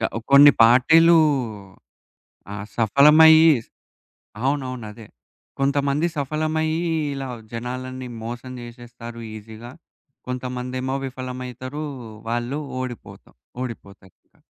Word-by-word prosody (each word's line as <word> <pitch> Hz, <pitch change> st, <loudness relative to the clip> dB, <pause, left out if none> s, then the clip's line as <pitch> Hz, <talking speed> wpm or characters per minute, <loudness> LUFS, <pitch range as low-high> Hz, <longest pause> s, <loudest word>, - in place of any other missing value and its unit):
క -, -, -8 dB, 0.3 s
కొన్ని 145 Hz, +1 st, +9 dB
పార్టీలూ 160 Hz, +8 st, +6 dB, 1.4 s
ఆహ్, 105 Hz, 0 st, -6 dB
సఫలమయ్యి 155 Hz, +7 st, +6 dB, 0.9 s
అవునవును. 130 Hz, -4 st, -2 dB
అదే! 110 Hz, -1 st, -13 dB, 0.5 s
కొంతమంది 140 Hz, +3 st, +1 dB
సఫలమయ్యి 155 Hz, +3 st, -1 dB, 0.3 s
ఇలా, 135 Hz, -1 st, -5 dB, 0.3 s
జనాలన్నీ 130 Hz, +2 st, -6 dB, 0.2 s
మోసం 120 Hz, +2 st, -7 dB
జేసేస్తారు 120 Hz, -1 st, -10 dB
ఈజీగా? 110 Hz, +3 st, -11 dB, 0.6 s
కొంతమందేమో 125 Hz, +1 st, -4 dB
విఫలమైతరు. 130 Hz, +2 st, -7 dB, 0.5 s
వాళ్ళు 120 Hz, +5 st, -2 dB, 0.2 s
ఓడిపోతాం 125 Hz, -3 st, -9 dB, 0.3 s
ఓడిపోతారు. 100 Hz, -6 st, -9 dB, 0.2 s
ఆ! -, -, -32 dB
130 Hz, 85 wpm, -22 LUFS, 120-140 Hz, 1.4 s, కొన్ని